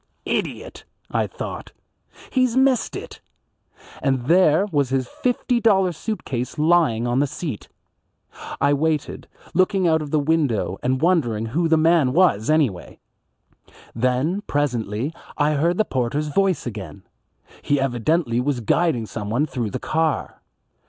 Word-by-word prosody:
"Idiot," - - -3 0.3
I - - 0
thought, - - -7 0.6
"he's 255 -2 +1
missed 265 -2 +2
it;" - - -8 0.8
and 135 -3 0
there 170 +2 +4
was 140 -4 +1
his 130 -1 0
fifty 245 - -1
dollar 195 -5 +3
suit 215 +6 -5
case 125 +2 -4
lying 150 -8 +3
on 120 +2 +1
the 145 - +2
seat. 140 - -6 0.9
I 140 +1 +3
waited, 155 +1 -1 0.3
looking 185 +1 +2
out 160 -1 +3
of 150 - -6
the 155 - +1
window 145 - 0
and 130 +1 0
wondering 125 -12 +1
who 160 +9 0
the 160 0 +3
man 155 -5 +3
was, 155 - +3
anyway. 140 - 0 1.0
Then 130 - 0
presently 125 -2 -1 0.2
I 150 +1 +2
heard 170 +5 +1
the 215 - +2
porter's 135 - -1
voice 190 +1 +1
again. 100 -4 -7 0.6
He 145 -1 +1
evidently 130 0 0
was 130 0 -1
guiding 125 0 +1
someone 110 +6 -2
through 125 -7 -3
the - - -4
car. 160 -1 -1
145 Hz, 140 wpm, -22 LUFS, 125-170 Hz, 1.0 s, there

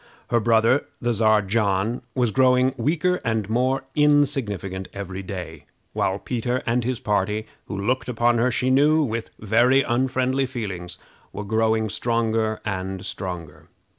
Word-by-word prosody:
Her 120 - +4
brother, 115 +4 +3
the 120 0 0
Czar 110 -1 +3
John, 100 +2 0
was 125 -4 +1
growing 130 +1 +3
weaker 165 +8 0
and 110 -4 -1
more 130 +3 +1
insignificant 130 -11 +1
every 95 -1 -5
day; 85 -5 -7 0.3
while 95 - 0
Peter 125 +3 -2
and 120 +1 +1
his 125 0 -2
party, 105 +1 -1 0.2
who 100 - -5
looked 125 +7 -1
upon 120 0 +2
her, 125 +2 +3
she 125 +2 0
knew, 150 +4 +4
with 115 -4 -3
very 120 +6 +3
unfriendly 130 +2 0
feelings, 95 -9 -5 0.3
were 105 - -6
growing 110 +1 +1
stronger 110 0 0
and 95 -1 -4
stronger. 85 -5 -6
115 Hz, 140 wpm, -23 LUFS, 100-125 Hz, 0.3 s, Her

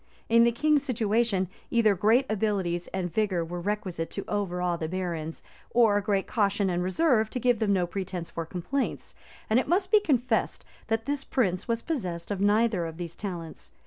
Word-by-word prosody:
In 230 0 +6
the 235 - +4
king's 300 +4 +2
situation, 220 -6 +1 0.2
either 225 -3 +4
great 220 +8 +3
abilities 195 -5 -1
and 180 -3 -4
vigor 190 -5 +1
were 175 +1 -5
requisite 190 -4 -3
to - - -5
overawe 180 -4 -1
the 160 -1 -3
barons, 170 -3 -4 0.3
or 220 -4 +4
great 200 -1 0
caution 200 -3 +1
and 175 0 0
reserve 220 - +2
to 250 - -3
give 245 -2 +2
them 215 -2 +1
no 180 -2 +2
pretence 180 -1 -4
for 165 - -3
complaints; 180 - -3 0.3
and 220 +3 +4
it - - -2
must 375 +2 +1
be 430 - +7
confessed, 260 - 0 0.2
that 225 0 -1
this 285 0 -2
prince 185 -11 0
was 230 -1 -1
possessed 185 - -3
of 195 -1 -2
neither 205 -3 +2
of 160 0 -8
these 170 -2 -5
talents. 165 - -7
205 Hz, 180 wpm, -27 LUFS, 175-230 Hz, 0.3 s, be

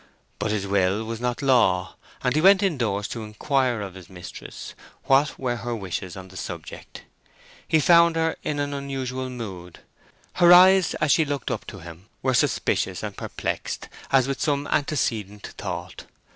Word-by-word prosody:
But 105 +2 -1
his 105 -2 -1
will 100 +1 +1
was 115 +1 -5
not 125 +2 -2
law, 115 -9 +3 0.3
and 125 - +2
he 155 - +2
went 195 +2 +6
indoors 115 - 0
to 115 - -5
inquire 120 +2 0
of 100 -2 -6
his 95 -2 -13
mistress 90 -2 -9 0.3
what 135 +2 +3
were 120 -2 -2
her 120 0 -4
wishes 95 -3 -5
on 95 0 -9
the 95 - -12
subject. 85 -4 -8 0.6
He 160 - +3
found 170 +2 +5
her 160 0 +1
in 150 - -2
an 145 0 -2
unusual 130 -2 -4
mood: 95 -8 -8 0.6
her 175 0 +6
eyes 185 0 +7
as 155 - +1
she 160 - +5
looked 145 -2 -3
up - - -4
to 100 -5 -9
him 85 +3 -12 0.2
were 130 0 +2
suspicious 120 - 0
and - - -5
perplexed - - -4 0.2
as 135 -1 +4
with 135 -1 -3
some 145 -1 0
antecedent 110 -9 -1
thought. - - -6
125 Hz, 170 wpm, -24 LUFS, 100-145 Hz, 0.6 s, eyes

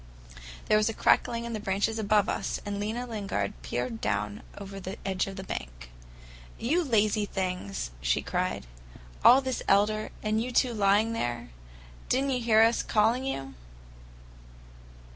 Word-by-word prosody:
There 215 - +4
was 215 - +2
a 225 - -4
crackling 235 0 +2
in 235 - -4
the 215 - -3
branches 205 +3 0
above 210 -1 +3
us, - - -2
and 205 0 -3
Lena 220 +4 -2
Lingard 200 - -3
peered 120 - -3
down 105 0 -1 0.2
over 195 -1 -7
the 190 +1 -6
edge 190 -1 0
of 195 - -6
the 190 - -6
bank. - - -7 0.7
"You 315 +10 +1
lazy 215 -5 +2
things!" 180 - -3
she - - +1
cried. - - -2 0.6
"All 255 +3 +8
this 260 -1 -2
elder, 215 +2 +3
and 215 0 +1
you 250 +2 -3
two 245 0 +2
lying 210 +2 +3
there! 120 - -3 0.6
Did 260 +2 +2
n't 275 - 0
you 255 - +1
hear 220 -2 +5
us 230 +1 +3
calling 230 +5 +2
you?" 135 - -4
210 Hz, 160 wpm, -28 LUFS, 180-230 Hz, 0.7 s, All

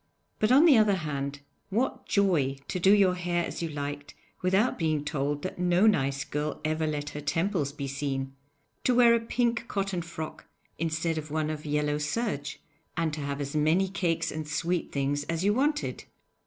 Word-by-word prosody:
But 215 +2 +2
on 280 +6 +7
the 285 -9 +7
other 210 -2 +4
hand, 145 -4 -4 0.3
what 235 +7 -1
joy 165 -10 +2
to 185 - -2
do 190 +3 +5
your 200 -3 +5
hair 175 -1 -1
as - - -5
you 165 - -2
liked 145 -1 -5 0.3
without 190 +6 +2
being 155 -3 0
told 145 -1 -2
that 185 - -5
no 180 +2 +3
nice 140 -9 +2
girl 150 +1 -3
ever 155 0 0
let 150 -1 -3
her 150 - -6
temples 165 0 0
be 140 -1 -5
seen; 135 -1 -3 0.5
to 250 - +3
wear 240 -1 +7
a 235 - +4
pink 230 0 0
cotton 195 -3 -1
frock 160 -2 -7 0.3
instead 165 0 0
of 155 0 -8
one 155 0 -1
of 155 0 -6
yellow 150 0 0
serge, 150 -2 -2 0.4
and 165 -2 0
to 150 - -4
have 140 0 -3
as 140 +1 -4
many 160 +6 +3
cakes 175 -3 0
and 155 -1 -5
sweet 170 +3 -1
things 140 +1 0
as 165 +2 -2
you 205 +1 +3
wanted! 295 +5 0
160 Hz, 185 wpm, -28 LUFS, 145-195 Hz, 0.5 s, on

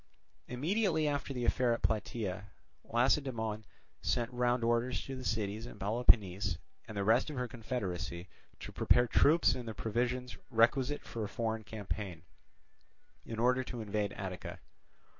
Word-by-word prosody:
Immediately 160 - +1
after 145 -1 -1
the 125 -2 -2
affair 125 -1 +3
at 115 - -4
Plataea, 105 -3 -1 0.4
Lacedaemon 115 -3 +1 0.4
sent 120 +1 0
round 125 0 +1
orders 120 +2 +1
to 135 - -5
the 130 - -6
cities 110 0 -2
in 115 - -10
Peloponnese 100 -4 +3 0.3
and 110 -2 -7
the 100 - +1
rest 115 +8 +4
of 150 - -5
her 125 -1 -1
confederacy 100 -7 -4 0.3
to - - -6
prepare 120 - +4
troops 155 +7 +5
and 125 -2 -6
the 110 - -5
provisions 125 +3 -1
requisite 130 +4 +3
for 115 - -5
a 105 - -3
foreign 110 -1 -2
campaign, 100 -5 -5 1.0
in 115 - -5
order 125 +3 +3
to 125 -1 -6
invade 105 -1 -1
Attica. 95 -2 -6
115 Hz, 145 wpm, -33 LUFS, 105-125 Hz, 1.0 s, troops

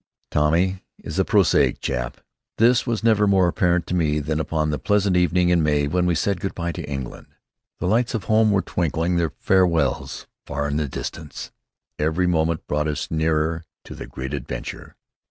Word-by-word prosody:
Tommy 85 +6 +2 0.2
is - - -5
a - - +4
prosaic - - +3
chap. 60 -1 -3 0.4
This 120 +3 +4
was 115 -2 -1
never 110 -3 +4
more 95 -2 +4
apparent 85 0 +1
to - - -4
me 75 -4 +1
than 75 +1 -2
upon 80 -1 -1
that 75 - -2
pleasant 105 -2 +1
evening 90 0 +3
in 90 -1 +3
May 75 -1 +2
when 90 +4 0
we 85 - +2
said 95 +4 0
good 95 +1 -4
bye 85 0 -2
to - - -6
England. 70 -3 -6 0.5
The - - -4
lights 115 +6 +1
of 110 - -2
home 110 0 +3
were 100 -2 +2
twinkling 85 +1 -1
their 85 -2 +1
farewells 85 -7 +1 0.2
far 70 0 -2
in 75 0 -1
the 75 -2 -1
distance. 75 +3 -7 0.5
Every 80 +4 +1
moment 80 -2 0
brought 75 +1 -1
us 75 -2 -3
nearer 80 +1 0 0.2
to - - -10
the - - -8
great 65 +2 -6
adventure. 70 -4 -6
85 Hz, 185 wpm, -23 LUFS, 75-95 Hz, 0.5 s, a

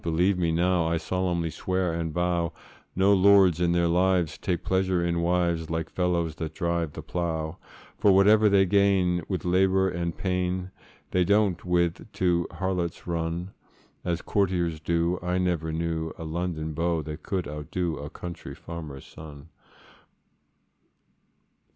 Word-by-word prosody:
believe 85 +4 +2
me 85 -2 0
now 85 0 +2
I 85 0 +1
solemnly 85 -2 -1
swear 95 -1 -1
and 85 -1 -2
vow, 85 0 0 0.4
No 95 +2 +4
lords 95 -3 +5
in 85 -1 +3
their 85 0 +2
lives 90 -2 +2
take 90 -2 -2
pleasure 95 -1 +1
in 85 0 0
wives, 85 -2 0
Like 80 -1 -3
fellows 85 -3 0
that 80 -1 -5
drive 85 -4 -1
the - - -7
plough: 80 -1 -3 0.4
For 100 - +5
whatever 105 +3 +6
they 100 -1 +5
gain 95 -2 +3
with 90 -5 -3
labour 95 +1 +3
and 85 0 -3
pain, 90 0 -1 0.4
They 90 - +3
don't 100 -1 +2
with 85 -1 +1
't - - -16
to 85 -2 +1
harlots 90 -3 -2
run, 85 +2 -3 0.5
As 85 -1 -2
courtiers 90 -5 0
do. 85 +2 0
I 90 +1 -1
never 85 -3 0
knew 80 0 -2
A - - -7
London 80 -1 -3
beau 85 0 0
that 75 0 -7
could 95 0 -3
outdo 75 +3 -3
A 75 +1 -6
country 85 +1 -8
farmer's 80 -5 -8
son. 75 0 -12
85 Hz, 150 wpm, -26 LUFS, 80-90 Hz, 0.5 s, whatever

